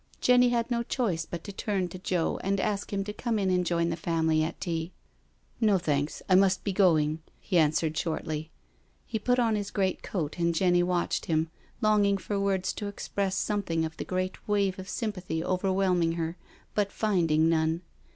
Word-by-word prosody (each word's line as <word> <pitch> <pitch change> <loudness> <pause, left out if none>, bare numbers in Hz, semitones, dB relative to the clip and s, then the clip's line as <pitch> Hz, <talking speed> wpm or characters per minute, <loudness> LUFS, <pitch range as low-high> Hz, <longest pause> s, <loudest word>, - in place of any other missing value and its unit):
Jenny 250 0 +5
had 235 0 0
no 235 -1 +1
choice 230 -8 -1
but 170 -1 -6
to 200 - -7
turn 195 -2 -1
to 185 - -8
Joe 180 -3 -1
and 195 +1 0
ask 205 +1 -1
him 200 -1 -1
to 210 +1 -5
come 230 +1 -1
in 195 -2 +1
and 180 0 +2
join 170 -1 +1
the 165 - -1
family 160 -1 +1
at 160 +1 -4
tea. 165 0 -3 0.7
"No, 215 -4 +4
thanks— 150 -4 -1
I 185 - +3
must 190 0 +4
be 200 - -1
going," 160 -5 +3 0.2
he 180 -4 +1
answered 155 0 +2
shortly. 155 -1 -3 0.6
He 220 - -3
put 245 +4 +2
on 230 -3 +2
his 205 -1 -2
great 190 -2 0
coat 170 -3 -3
and 170 0 +1
Jenny 175 0 +3
watched 175 0 0
him, 160 0 +1 0.3
long 215 -1 +4
ing 200 0 +3
for 200 +1 -3
words 195 -2 0
to 205 - -5
express 200 -1 -2
something 190 -6 0
of 160 0 -6
the - - -3
great 185 0 -3
wave 200 -2 +1
of 190 0 -7
sympathy 185 -8 -3
overwhelming 185 -2 +1
her, 165 0 -3 0.4
but 205 -1 0
finding 165 -7 +2
none. 160 +1 +1
185 Hz, 190 wpm, -28 LUFS, 165-205 Hz, 0.7 s, Jenny